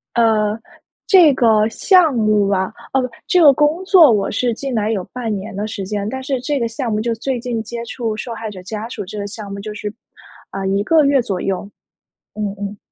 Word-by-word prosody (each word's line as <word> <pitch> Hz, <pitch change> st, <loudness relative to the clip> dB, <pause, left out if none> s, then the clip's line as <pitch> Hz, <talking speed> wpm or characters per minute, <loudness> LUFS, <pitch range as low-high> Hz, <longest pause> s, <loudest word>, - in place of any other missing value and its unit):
呃， 220 Hz, -2 st, +2 dB, 0.5 s
这 355 Hz, -9 st, +7 dB
个 220 Hz, -4 st, +3 dB
项 355 Hz, -, +4 dB
目 215 Hz, -3 st, +2 dB
啊 190 Hz, -1 st, +1 dB, 0.3 s
哦， 255 Hz, -2 st, +1 dB, 0.2 s
这 365 Hz, -4 st, +4 dB
个 290 Hz, -3 st, +9 dB
工 300 Hz, +6 st, +1 dB
作 340 Hz, -, +7 dB
我 200 Hz, -2 st, +1 dB
是 240 Hz, +2 st, 0 dB
进 270 Hz, +2 st, -5 dB
来 215 Hz, 0 st, 0 dB
有 195 Hz, -4 st, -1 dB
半 230 Hz, -4 st, -4 dB
年 195 Hz, 0 st, -7 dB
的 205 Hz, +1 st, -3 dB
时 200 Hz, -3 st, -5 dB
间， 205 Hz, 0 st, -3 dB
但 265 Hz, +4 st, -4 dB
是 265 Hz, -1 st, -2 dB
这 290 Hz, 0 st, -1 dB
个 235 Hz, -, 0 dB
项 230 Hz, 0 st, -4 dB
目 215 Hz, 0 st, 0 dB
就 235 Hz, 0 st, -1 dB
最 250 Hz, +2 st, -3 dB
近 235 Hz, -2 st, -3 dB
接 235 Hz, +1 st, -6 dB
触 225 Hz, -2 st, -3 dB
受 230 Hz, +2 st, -5 dB
害 220 Hz, -1 st, -6 dB
者 190 Hz, -3 st, -9 dB
家 215 Hz, +3 st, -5 dB
属 245 Hz, -, -5 dB
这 210 Hz, +3 st, -8 dB
个 200 Hz, -, -3 dB
项 205 Hz, -1 st, -8 dB
目， 200 Hz, -, -6 dB
就 210 Hz, +1 st, -6 dB
是， 210 Hz, -1 st, -5 dB, 0.6 s
啊， 195 Hz, 0 st, -4 dB
1 195 Hz, +1 st, +1 dB
个 315 Hz, +4 st, +4 dB
月 275 Hz, -2 st, +3 dB
左 195 Hz, -6 st, -3 dB
右， 195 Hz, +1 st, -2 dB, 0.7 s
嗯 205 Hz, -2 st, -3 dB
嗯。 205 Hz, 0 st, -5 dB
225 Hz, 230 characters per minute, -18 LUFS, 205-255 Hz, 0.7 s, 个